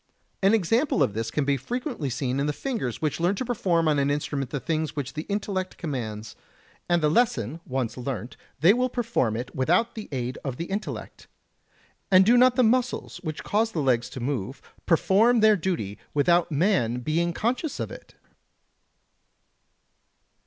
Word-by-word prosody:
An 200 +3 +5
example 225 - +2
of 110 - 0
this 115 +1 -2
can 145 +4 -1
be 140 0 +2
frequently 245 - -4
seen 130 +1 -2
in 140 - 0
the 150 - 0
fingers, 190 - -4
which 155 0 0
learn 175 +4 +2
to 255 - -3
perform 180 -9 +1
on 150 -2 +3
an 140 0 +1
instrument 145 -2 -2
the 140 - -3
things 155 +1 -2
which 140 -3 -4
the 155 +1 -5
intellect 195 -2 -2
commands, 115 - -5 0.5
and 175 -2 +2
the - - +5
lesson 155 - +1
once 130 -3 -2
learnt 125 -2 -5 0.3
they 175 +6 +7
will 250 +2 +1
perform 230 - 0
it 125 +2 -6
without 175 - +2
the 215 -2 -8
aid 125 -2 -3
of 135 -3 -4
the 170 - -3
intellect. 200 +4 -6 0.8
And 185 0 +6
do 235 +4 +5
not 250 0 +5
the 255 - +4
muscles 245 -1 0
which 155 -4 -6
cause 220 +2 0
the 165 - -1
legs 125 -3 +1
to 130 - -7
move 130 -1 -3 0.3
perform 210 +8 +4
their 215 -1 +6
duty 160 - -3 0.2
without 170 +4 +3
man 145 - +1
being 165 +5 0
conscious 245 - -2
of - - -3
it? - - -12
160 Hz, 175 wpm, -26 LUFS, 130-210 Hz, 0.8 s, they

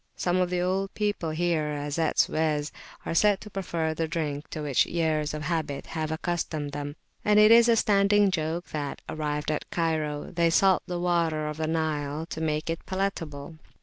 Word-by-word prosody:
Some 180 0 0
of 180 -1 +1
the 180 0 0
old 190 +2 0
people 205 -6 -1
here, 155 -2 0
as 145 +2 -3
at 160 - 0
Suez, 150 -2 +1 0.3
are - - -2
said 205 +3 +4
to 210 - -10
prefer 170 -4 -2
the 160 +1 -2
drink 155 -3 -3
to 155 - -5
which 140 -4 +3
[p.228] - - -11
years 155 -3 +1
of 150 - -5
habit 155 -3 -2
have 155 -1 -3
accustomed 160 -3 -2
them, 145 0 -5 0.3
and 210 0 +4
it 215 +1 +7
is 235 +1 +7
a 230 - +6
standing 205 -1 +4
joke 165 0 -2
that, 145 -2 -4
arrived 150 -1 -2
at 150 - -3
Cairo, 155 -3 -1
they 170 -1 +3
salt 190 +2 +4
the 175 -1 -3
water 170 -3 +1
of 150 0 -4
the 160 0 -1
Nile 155 -1 -1
to 160 - -4
make 155 -1 -1
it 165 0 -3
palatable. 165 -6 -3
160 Hz, 195 wpm, -27 LUFS, 150-180 Hz, 0.3 s, it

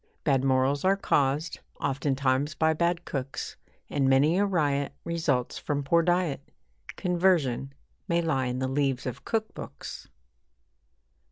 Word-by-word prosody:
Bad 135 -4 +2
morals 135 +1 +2
are 195 +1 +3
caused, 145 -3 +1 0.2
oftentimes 140 +1 0
by 160 0 +3
bad 170 +2 0
cooks, 135 -1 -4 0.3
And 135 -2 +1
many 145 +7 +4
a 205 - +3
riot 145 -6 0
results 155 -7 -1
from 145 -1 -2
poor 170 +5 +3
diet 175 -5 +1 0.5
Conversion 170 -8 +1 0.4
may 170 -2 +1
lie 135 -6 0
in 125 0 -2
the 130 0 -1
leaves 135 -2 0
of 125 +1 -5
cook 220 -1 -1
books. - - -8
145 Hz, 135 wpm, -27 LUFS, 135-170 Hz, 0.5 s, many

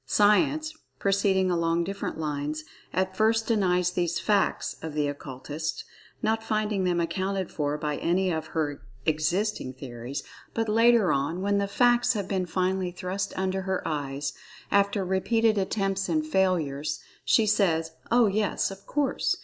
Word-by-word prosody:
Science, 290 - +3 0.2
proceeding 195 -2 +2
along 170 0 +1
different 195 +3 -4
lines, 150 0 -3 0.3
at 185 0 -1
first 225 +1 +3
denies 180 -5 +2
these 175 -1 0
"facts" 205 -2 +1
of 160 -2 -6
the 150 -1 +1
Occultists, 145 +2 -5 0.4
not 220 +1 +1
finding 215 -3 0
them 175 -1 +1
accounted 185 +2 -1
for 145 -1 -1
by 150 -1 -2
any 185 +2 +1
of 160 -1 -2
her 150 -3 -2 0.2
existing[Pg 170 +7 +1
4] 130 - -26
theories; 125 +1 -6 0.3
but, 225 0 0
later 230 -2 +5
on, 150 +7 -1
when 200 0 +2
the 200 - 0
"facts" 240 +4 +3
have 200 -4 -3
been 190 -2 -1
finally 185 +1 0
thrust 185 +2 -3
under 190 0 0
her 190 0 -2
eyes, 140 -2 -2 0.4
after 200 -1 +2
repeated 215 +4 +2
attempts 195 -1 -1
and 310 -1 +1
failures, 155 - 0 0.2
she 225 - +4
says, 175 -7 +2 0.2
"Oh, 240 0 +5
yes, 205 -1 0
of 195 0 -11
course!" 290 -2 0
190 Hz, 150 wpm, -27 LUFS, 160-210 Hz, 0.4 s, later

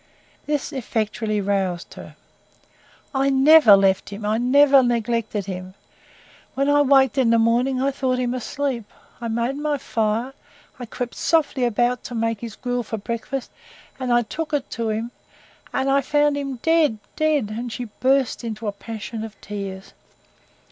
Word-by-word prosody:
This 295 0 -2
effectually 220 -4 -2
roused 190 -3 -2
her. - - -11 1.0
"I 270 0 +2
NEVER 270 -5 +7
left 195 -1 +2
him 205 +1 -7
I 215 +2 +1
NEVER 275 +2 +6
neglected 230 -4 -1
him. 185 -1 -7 0.8
When 275 +1 +1
I 290 0 +4
waked 270 -1 +4
in 250 -3 +3
the 230 - +4
morning 240 +3 +2
I 275 +1 +1
thought 260 -2 -1
him 250 -1 -1
asleep. 255 -1 -3 0.4
I 235 - -3
made 235 +4 -1
my 295 0 -1
fire. 230 +1 -1 0.5
I 245 - -6
crept 245 +2 -5
softly 290 -6 +1
about 240 +2 +1
to 245 - -6
make 225 -1 -1
his 230 -2 -7
gruel 245 -1 -2
for 225 -1 -5
breakfast, 235 +5 -5 0.5
and 255 -2 -2
I 240 0 +4
took 315 +7 -5
it 285 -2 -2
him, 225 0 -2 0.6
and 275 +1 +1
found 295 +1 +2
him 275 -2 -3
dead 325 -8 +3 0.2
dead," 300 -9 +1
and 240 +1 -4
she 245 +3 -5
burst 265 -1 +1
into 225 -1 -5
a 205 - 0
passion 220 +2 -7
of 220 -2 -9
tears. 195 -2 -7
240 Hz, 155 wpm, -22 LUFS, 220-275 Hz, 1.0 s, NEVER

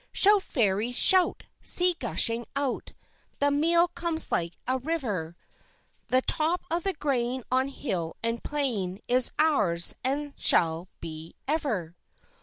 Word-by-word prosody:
Shout, 410 0 +5
Fairies, 225 - -1
shout! 370 +5 +4 0.2
see, 360 0 +4
gushing 230 0 +2
out, 275 -2 -3 0.4
The 285 0 +1
meal 335 +4 +3
comes 335 -2 -1
like 170 0 -1
a 260 +1 0
river: 230 - -4 0.7
The 255 +1 +2
top 325 +3 0
of 340 +1 0
the 390 +2 -2
grain 260 -5 -2
on 260 +1 +1
hill 185 - -4
and 230 0 -2
plain 220 -10 -3
Is 250 0 +3
ours, 210 - +2
and 280 +2 -3
shall 165 +1 +3
be 160 0 -8
ever. 230 - -2
260 Hz, 130 wpm, -26 LUFS, 195-310 Hz, 0.7 s, Shout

